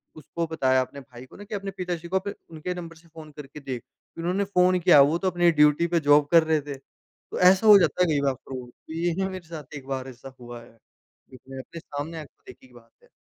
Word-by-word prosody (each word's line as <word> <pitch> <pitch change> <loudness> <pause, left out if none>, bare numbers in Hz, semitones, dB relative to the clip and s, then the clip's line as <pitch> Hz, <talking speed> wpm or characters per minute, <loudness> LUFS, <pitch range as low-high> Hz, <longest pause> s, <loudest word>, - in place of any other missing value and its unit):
उसको 165 +2 -5
बताया 130 -5 +1
अपने 140 +2 -7
भाई 125 0 -13
को - - -18
ना 205 - -10
कि 210 +1 -6
अपने 195 -1 -5
पिताजी 175 -2 -4
को 190 +2 0
फिर 200 - -5 0.2
उनके 160 +3 -5
नंबर 170 -2 -8
से 165 +1 -21
फ़ोन 160 -2 -13
करके 145 +1 -10
देख, 130 -4 -6 0.4
इन्होंने 180 +4 -1
फ़ोन 185 -2 +2
किया 170 -5 +6
वो 150 +4 +3
तो 185 +1 0
अपनी 175 0 +3
ड्यूटी 150 +2 +3
पे 170 0 +1
जॉब 145 -1 +4
कर 165 -1 +6
रहे 160 -1 +1
थे। 145 0 -7
तो 135 - -13
ऐसा 185 +4 +5
हो 210 - +10
जाता 180 0 +1
है - - +2
कई 145 - +1
बार 140 -1 +1
फ्रॉड 130 -1 -9
तो 160 - -14
ये 170 +1 -1
ना 190 0 0
मेरे 185 -3 -9
साथ 155 -4 -9
एक 135 -1 -12
बार 135 -1 -4
ऐसा 130 +1 -12
हुआ 120 -1 -10
है 115 - -20 0.5
जिसमें 130 +1 -12
अपने 165 +5 -10
सामने 155 +2 -6
आँखों 150 - -14
देखी 130 - -14
की 125 - -24
बात 115 -1 -18
है। - - -23
160 Hz, 250 wpm, -25 LUFS, 135-175 Hz, 0.5 s, हो